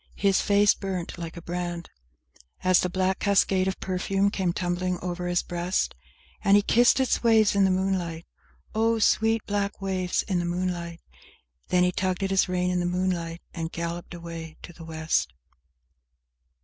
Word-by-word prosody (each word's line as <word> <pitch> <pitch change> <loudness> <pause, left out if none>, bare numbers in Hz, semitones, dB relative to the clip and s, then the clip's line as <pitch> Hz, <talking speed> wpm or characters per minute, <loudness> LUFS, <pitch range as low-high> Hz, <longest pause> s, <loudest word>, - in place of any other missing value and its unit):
His 195 -1 +2
face 205 0 +4
burnt 185 -3 -5
like 170 0 -6
a 170 - -8
brand 175 -1 -4 0.7
As 185 -1 +5
the 180 - 0
black 185 +1 0
cascade 195 -2 +2
of 190 - -2
perfume 195 +2 0
came 185 -4 0
tumbling 180 +1 -1
over 180 0 -4
his 175 0 +1
breast; 175 +1 -1 0.5
And 200 +1 +6
he 205 - +3
kissed 240 +5 +4
its 260 - +1
waves 220 -3 +4
in 200 -1 +4
the - - +3
moonlight, 185 -3 -1 0.5
(Oh, 225 +1 +2
sweet, 225 0 +2
black 205 -1 -2
waves 185 -2 -1
in 185 -3 -1
the 175 - -1
moonlight!) 175 -1 -3 0.7
Then 180 0 +3
he 180 - +3
tugged 185 +1 -1
at 195 - -1
his 190 -1 +3
rein 180 0 0
in 180 - 0
the 175 - 0
moonliglt, 175 -2 -2
and 165 -1 -4
galloped 170 +1 -5
away 165 -2 -8
to 175 - -10
the 165 - -12
West. 160 - -1
180 Hz, 170 wpm, -26 LUFS, 175-195 Hz, 0.7 s, And